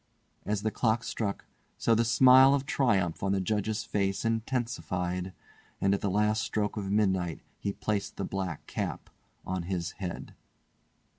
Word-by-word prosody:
As 105 -1 -1
the 110 - 0
clock 115 0 +1
struck, 105 -4 -3 0.3
so 115 - +2
the 115 +1 +3
smile 130 +3 +7
of 140 -1 -2
triumph 100 - +1
on 95 0 +1
the 100 - +1
Judge's 105 +2 -1
face 100 +1 -1
intensified, 95 - -2 0.5
and 95 0 +2
at 100 - -1
the 100 - 0
last 105 +2 +2
stroke 105 0 -1
of 100 -3 -3
midnight 95 -5 +1 0.2
he 100 - -2
placed 105 -1 -2
the 100 - -2
black 95 -5 -4
cap - - -4 0.3
on 95 -1 -2
his 85 -1 -3
head. 90 -3 -5
100 Hz, 155 wpm, -29 LUFS, 95-110 Hz, 0.5 s, smile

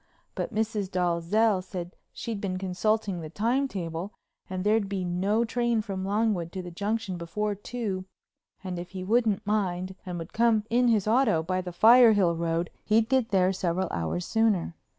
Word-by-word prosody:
But - - -3
Mrs. 215 -3 -1
Dalzell 185 +4 +1
said 180 -1 -7 0.2
she'd 225 -4 -5
been 185 -2 -2
consulting 195 +1 -1
the 155 - -7
time 235 - 0
tables 170 -4 -4 0.4
and 185 -1 -3
there'd 210 -1 +2
be 190 -2 -2
no 195 +6 +1
train 235 -1 0
from 195 -3 -4
Longwood 200 -4 0
to 185 - -4
the 175 - -8
Junction 200 +1 -2
before 205 +5 -2
two 205 -2 -4 0.6
and 180 -2 -4
if 175 0 -7
he 185 -1 -5
wouldn't 220 0 +1
mind 190 -3 -1
and 180 -2 -5
would 165 +1 -7
come 225 -2 +3
in 245 +1 +3
his 215 -4 +2
auto 220 -8 +3
by 185 +2 -1
the 180 -1 -6
Firehill 215 -3 +6
Road 165 +1 -1
he'd 220 +1 +2
get 260 -3 +2
there 190 -1 +3
several 185 0 -1
hours 85 - -2
sooner. 215 -7 +1
195 Hz, 170 wpm, -27 LUFS, 180-220 Hz, 0.6 s, Firehill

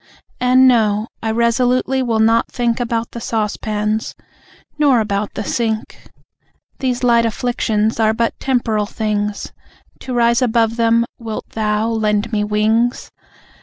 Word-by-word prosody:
And 255 +1 +5
no, 220 -3 +2
I 225 - -2
resolutely 245 +3 +1
will 235 -3 0
not 225 +1 +3
think 240 -1 -1
About 235 -1 -2
the 235 - -7
saucepans, 215 0 -2 0.6
nor 280 -5 +4
about 205 -1 -2
the 215 - -3
sink. 220 -1 -3 0.7
These 255 -2 -2
light 235 -1 +4
afflictions 225 -2 -1
are 220 -1 +3
but 230 +1 0
temporal 225 -5 0
things 210 -1 -3 0.5
To 255 -1 -5
rise 235 +1 +3
above 230 -2 +2
them, 230 0 +3
wilt 225 -2 -6
Thou 215 0 -1
lend 215 0 0
me 210 -1 +1
wings? 220 +3 0
230 Hz, 130 wpm, -18 LUFS, 215-240 Hz, 0.7 s, And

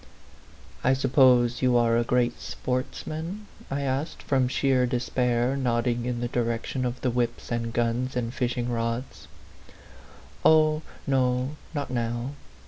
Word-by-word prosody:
" - - -24 0.3
I 130 - +4
suppose 130 -2 +4
you 125 -2 +4
are 115 -1 +3
a 120 - +3
great 120 0 +1
sportsman 160 +9 -4
?" - - -19
I 140 +1 -2
asked 140 +3 -2
from 130 -2 +2
sheer 130 -1 +2
despair, 125 0 0
nodding 120 -2 0
in 120 -1 -2
the 120 - 0
direction 120 +2 -1
of 125 0 -3
the 125 - +1
whips 120 0 -2
and 115 -1 -1
guns 120 +2 -1
and 120 -1 -2
fishing 125 -1 -1
rods. 115 +2 -3 1.2
"Oh, 155 -1 +5 0.2
no, 130 +1 +1 0.2
not 140 -3 -3
now. 120 +1 -2
125 Hz, 140 wpm, -26 LUFS, 120-130 Hz, 1.2 s, Oh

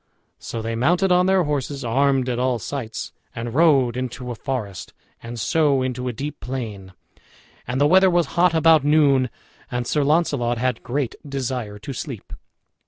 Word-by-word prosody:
So 115 -1 -5
they 115 +1 -2
mounted 175 +10 +2
on 180 +1 +4
their 190 -1 +4
horses, 145 -2 -3
armed 135 +2 +2
at 125 -1 -1
all 125 -1 +1
sights, 115 -1 -5 0.2
and 115 0 -5
rode 135 -6 +4
into 125 0 -4
a - - -4
forest, 115 -7 -5 0.3
and 115 0 -7
so 140 +1 +2
into 125 0 -3
a - - 0
deep 140 +6 -6
plain. 105 -8 -6 0.7
And 125 +2 -2
the 145 - +4
weather 190 +5 +6
was 175 -1 +2
hot 175 -1 +3
about 160 -2 +5
noon, 140 -4 +4 0.4
and 125 0 -2
Sir 150 +4 +1
Launcelot 140 -6 +1
had 125 0 -1
great 130 -1 -2
desire 130 -7 -4
to 110 +7 -7
sleep. 125 - -7
130 Hz, 170 wpm, -22 LUFS, 120-150 Hz, 0.7 s, weather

